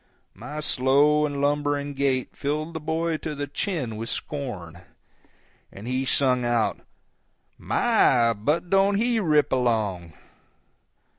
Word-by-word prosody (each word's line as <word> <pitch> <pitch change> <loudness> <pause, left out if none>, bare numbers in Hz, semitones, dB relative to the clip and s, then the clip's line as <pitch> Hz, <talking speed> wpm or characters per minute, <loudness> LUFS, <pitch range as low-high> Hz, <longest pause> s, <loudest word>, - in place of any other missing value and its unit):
My 145 +9 -7
slow 145 +3 +3
and 140 -1 -4
lumbering 145 0 0
gait 135 -2 -1
filled 155 +3 -3
the 160 - -4
boy 160 +1 -1
to 155 -1 -5
the 145 0 -3
chin 145 - -3
with 115 +1 -5
scorn, 95 - -5 0.9
and 100 +4 -10
he 130 +1 -1
sung 130 -2 +2
out, 120 -2 0 0.8
"My, 115 -2 +3
but 150 - -2
don't 195 +1 +4
he 230 +2 +1
rip 155 -7 +2
along!" 110 -10 -1
140 Hz, 125 wpm, -25 LUFS, 120-150 Hz, 0.9 s, don't